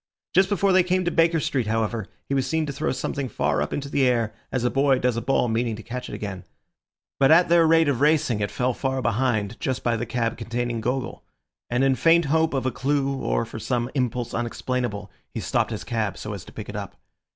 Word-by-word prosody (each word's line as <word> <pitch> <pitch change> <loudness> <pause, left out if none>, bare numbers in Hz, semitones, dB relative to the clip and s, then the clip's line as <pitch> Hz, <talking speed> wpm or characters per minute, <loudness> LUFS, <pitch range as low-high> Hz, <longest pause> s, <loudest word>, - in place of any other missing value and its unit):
Just 190 +2 +4
before 200 -1 +2
they 185 - +6
came 185 0 0
to 175 - +1
Baker 165 0 +3
Street, 130 -6 -1
however, 110 -1 -1 0.2
he - - -2
was 135 -1 +1
seen 160 +2 0
to 140 - -4
throw 135 - -1
something 130 0 -3
far 75 - 0
up 75 - -2
into 140 0 -3
the 140 -1 +2
air, 115 -3 +1 0.2
as 125 - -1
a 125 - +1
boy 135 -1 +3
does 125 -2 +1
a 115 - -1
ball 125 +1 +1
meaning 115 0 0
to 110 - -10
catch 125 +1 -6
it - - -5
again. 95 -3 -6 0.8
But 135 - +5
at 165 +3 +6
their 170 -1 +5
rate 165 0 +5
of 140 -3 0
racing 150 -7 +3
it 105 0 -1
fell 125 0 0
far 130 +1 -2
behind, 115 -2 0
just 130 -1 -2
by 120 -1 +1
the 115 +1 -3
cab 115 -1 -1
containing 120 0 -2
Gogol; 125 +2 -3 0.5
and 120 +2 +1
in 135 0 +4
faint 165 +4 +4
hope 160 +1 +2
of 130 - -1
a 130 - +1
clue 140 +1 0
or - - 0
for - - -8
some 120 0 -1
impulse 125 -3 -1
unexplainable, 120 -3 -3 0.2
he - - -1
stopped - - 0
his - - -5
cab 110 -4 -2
so 105 - -5
as 100 - -7
to - - -13
pick - - -8
it - - -7
up. - - -6
125 Hz, 235 wpm, -24 LUFS, 115-145 Hz, 0.8 s, they